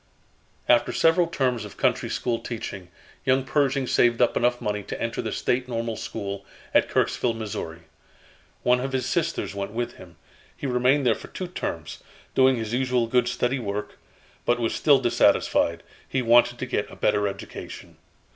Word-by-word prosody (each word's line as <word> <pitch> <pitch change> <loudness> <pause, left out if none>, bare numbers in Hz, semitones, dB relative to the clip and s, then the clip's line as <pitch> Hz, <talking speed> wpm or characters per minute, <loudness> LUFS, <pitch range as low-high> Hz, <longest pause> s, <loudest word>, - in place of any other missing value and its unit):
After 120 -1 +4
several 165 +1 +3
terms 125 -8 0
of 105 - -10
country - - +1
school 120 -2 -1
teaching, 100 -6 -6 0.4
young 130 0 +2
Pershing 135 -1 +1
saved 120 -1 +3
up 120 - +3
enough 120 0 +2
money 105 0 -2
to - - -6
enter 115 0 -2
the - - -4
State 125 +1 0
Normal 115 -2 -2
School, 100 -1 -5 0.3
at - - +4
Kirksville, 120 -2 +1
Mo. 105 -7 -5 0.9
One 125 0 +4
of 135 +1 -3
his 130 -2 0
sisters 165 -3 -1
went 100 +1 -4
with 120 +1 -3
him. - - -13 0.4
He - - -6
remained 130 +2 +2
there 120 - +5
for - - -9
two 185 - -6
terms, 80 - -5 0.3
doing 130 0 +5
his 110 -1 -4
usual 125 -1 +1
good 120 +1 +2
steady 125 +1 0
work, 105 -2 -4 0.4
but 120 - +2
was 115 -1 0
still 145 -2 +5
dissatisfied. 115 -8 +2 0.3
He 130 - 0
wanted 120 +1 +5
to 130 - -3
get 105 -5 -2
a - - -11
better 105 -1 +1
education. 100 - -8
120 Hz, 170 wpm, -25 LUFS, 110-130 Hz, 0.9 s, there